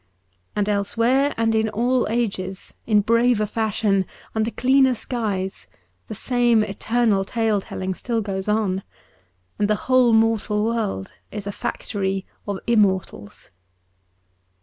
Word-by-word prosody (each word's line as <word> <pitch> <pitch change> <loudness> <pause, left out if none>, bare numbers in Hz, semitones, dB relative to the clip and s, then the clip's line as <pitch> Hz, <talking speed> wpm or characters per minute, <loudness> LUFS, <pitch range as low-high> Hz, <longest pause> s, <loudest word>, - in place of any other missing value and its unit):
And 205 -1 0
elsewhere, 230 +7 +2
and 225 0 +2
in 220 0 +2
all 245 +4 +1
ages, 195 -5 -3
in 210 -2 +4
braver 230 0 +3
fashion, 210 -3 0 0.3
under 220 0 0
cleaner 260 +1 +3
skies, 195 - -3 0.4
the - - -6
same 240 -3 +2
eternal 215 0 +1
tale 220 -1 0
telling 190 0 -4
still 230 +5 -2
goes 195 -2 -3
on, 210 -3 +1 0.8
and 205 - +2
the 215 - +3
whole 255 -2 +4
mortal 220 -1 +2
world 220 - -2 0.2
is 205 -1 -6
a 200 - -3
factory 195 -1 -3 0.2
of 200 -1 -2
immortals. 190 - 0
215 Hz, 125 wpm, -22 LUFS, 195-235 Hz, 0.8 s, in